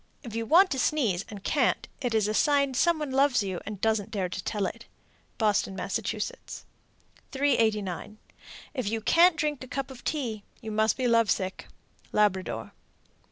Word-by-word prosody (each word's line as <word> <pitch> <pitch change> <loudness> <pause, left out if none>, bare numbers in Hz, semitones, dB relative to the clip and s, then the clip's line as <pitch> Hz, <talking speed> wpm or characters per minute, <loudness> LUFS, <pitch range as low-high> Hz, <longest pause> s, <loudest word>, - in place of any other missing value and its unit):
If 230 -4 -8
you 230 0 -2
want 370 - +6
to 265 - -1
sneeze 230 - +1
and 205 -2 -9
can't, 275 0 +1
it 245 -4 -1
is 215 -2 +2
a 215 - -1
sign 280 +2 +3
some 340 +6 +3
one 300 -3 -4
loves 270 -4 +3
you, 190 -3 -3
and 210 -2 -5
doesn't 220 -1 0
dare 190 -4 -2
to 185 - -5
tell 210 -3 -1
it. 230 +5 -6 0.5
Boston, 205 -3 +1
Mass. 195 +1 -2
389. 215 - -3 0.6
If 255 -8 -2
you 225 +1 -1
can't 335 +9 +5
drink 295 -3 -1
a - - -9
cup 275 +1 -4
of 250 -2 -12
tea, 240 -9 -2 0.2
you 220 -3 -7
must 215 +1 +2
be 255 -2 0
love 230 -2 +3
sick. 190 -1 -2 0.4
_Labrador. 200 -3 0
225 Hz, 170 wpm, -28 LUFS, 210-270 Hz, 0.6 s, want